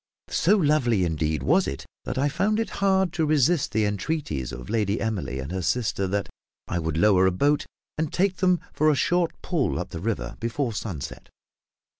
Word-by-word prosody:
So 205 Hz, +5 st, +3 dB
lovely 145 Hz, -, +2 dB
indeed 80 Hz, -2 st, -1 dB
was -, -, +3 dB
it 70 Hz, 0 st, -5 dB, 0.2 s
that 125 Hz, -, -3 dB
I 140 Hz, +2 st, +2 dB
found 200 Hz, +9 st, +1 dB
it 225 Hz, -, -2 dB
hard 190 Hz, -3 st, +3 dB
to 165 Hz, -, 0 dB
resist 155 Hz, +1 st, +2 dB
the 110 Hz, 0 st, +2 dB
entreaties 100 Hz, -, -2 dB
of 60 Hz, -2 st, -8 dB
Lady 105 Hz, -2 st, 0 dB
Emily 90 Hz, -, -2 dB
and 65 Hz, +4 st, -5 dB
her 95 Hz, 0 st, -2 dB
sister 100 Hz, +1 st, 0 dB
that 100 Hz, +1 st, -1 dB, 0.4 s
I 85 Hz, -, -1 dB
would 80 Hz, -1 st, -2 dB
lower 95 Hz, 0 st, +5 dB
a -, -, +3 dB
boat 145 Hz, +11 st, +1 dB, 0.3 s
and 155 Hz, -2 st, -1 dB
take 185 Hz, 0 st, +1 dB
them 180 Hz, -2 st, +3 dB
for 155 Hz, +1 st, +3 dB
a 150 Hz, -, +3 dB
short 175 Hz, +4 st, +2 dB
pull 165 Hz, -7 st, 0 dB
up -, -, -4 dB
the 85 Hz, -, -6 dB
river 110 Hz, +5 st, -3 dB
before 115 Hz, +1 st, -2 dB
sunset. 95 Hz, -9 st, -6 dB
115 Hz, 190 wpm, -25 LUFS, -, 0.4 s, lower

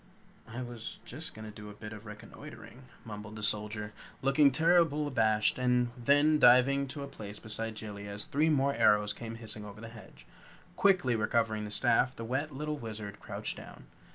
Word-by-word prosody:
"I 120 Hz, +2 st, -5 dB
was 120 Hz, -2 st, -7 dB
just 155 Hz, +6 st, -8 dB
going 110 Hz, 0 st, -8 dB
to 105 Hz, -, -9 dB
do 105 Hz, 0 st, -9 dB
a 105 Hz, -, -11 dB
bit 105 Hz, +1 st, -8 dB
of 105 Hz, +1 st, -11 dB
reconnoitering," 105 Hz, +4 st, -11 dB, 0.2 s
mumbled 105 Hz, 0 st, -8 dB
the 105 Hz, -, -7 dB
Soldier, 105 Hz, 0 st, 0 dB, 0.3 s
looking 140 Hz, +2 st, +5 dB
terrible 160 Hz, 0 st, +3 dB
abashed 110 Hz, -5 st, +2 dB
and 125 Hz, -1 st, +2 dB
then 145 Hz, +5 st, +3 dB
diving 135 Hz, +2 st, +5 dB
to 140 Hz, +2 st, -6 dB
a -, -, -6 dB
place 105 Hz, -5 st, -9 dB
beside 110 Hz, 0 st, -4 dB
Jellia 100 Hz, -1 st, -7 dB
as 100 Hz, +1 st, -4 dB
three 155 Hz, +3 st, +1 dB
more 140 Hz, -2 st, +2 dB
arrows 105 Hz, -3 st, +3 dB
came 115 Hz, +1 st, -7 dB
hissing 110 Hz, -2 st, -3 dB
over 105 Hz, 0 st, -10 dB
the 115 Hz, 0 st, -8 dB
hedge. 115 Hz, -1 st, -14 dB, 0.5 s
Quickly 180 Hz, -11 st, +3 dB
recovering 110 Hz, -1 st, 0 dB
the -, -, -6 dB
staff, 125 Hz, +3 st, +3 dB
the 115 Hz, -, -6 dB
wet 135 Hz, +6 st, -2 dB
little 150 Hz, +2 st, -4 dB
Wizard 105 Hz, -3 st, -7 dB
crouched -, -, -5 dB
down. -, -, -11 dB
115 Hz, 180 wpm, -31 LUFS, 105-140 Hz, 0.5 s, looking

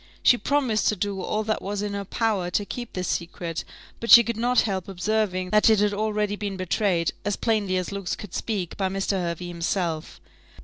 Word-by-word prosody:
She -, -, +7 dB
promised 255 Hz, -4 st, +1 dB
to 215 Hz, -, +3 dB
do 200 Hz, 0 st, -2 dB
all 215 Hz, +3 st, -1 dB
that 215 Hz, 0 st, -1 dB
was 205 Hz, +1 st, -3 dB
in 205 Hz, -1 st, -3 dB
her 200 Hz, 0 st, -3 dB
power 205 Hz, -4 st, 0 dB
to 205 Hz, +3 st, 0 dB
keep 240 Hz, +2 st, -6 dB
this 185 Hz, -1 st, -3 dB
secret, 170 Hz, -1 st, -3 dB, 0.4 s
but 230 Hz, -, -5 dB
she 235 Hz, -, +11 dB
could 235 Hz, 0 st, -2 dB
not 245 Hz, +2 st, +3 dB
help 190 Hz, -4 st, -2 dB
observing 185 Hz, -1 st, -1 dB
that 210 Hz, +1 st, +5 dB
it 220 Hz, -2 st, +5 dB
had 205 Hz, 0 st, +2 dB
already 210 Hz, 0 st, 0 dB
been 200 Hz, -2 st, -4 dB
betrayed, 185 Hz, -2 st, +1 dB
as 205 Hz, -1 st, 0 dB
plainly 210 Hz, -5 st, 0 dB
as 185 Hz, +1 st, -3 dB
looks 200 Hz, -2 st, -3 dB
could 205 Hz, -4 st, -10 dB
speak, 195 Hz, -7 st, -3 dB
by 190 Hz, -1 st, 0 dB
Mr. 195 Hz, +1 st, -1 dB
Hervey 175 Hz, -2 st, -2 dB
himself. 170 Hz, -2 st, -2 dB
200 Hz, 205 wpm, -25 LUFS, 185-215 Hz, 0.4 s, she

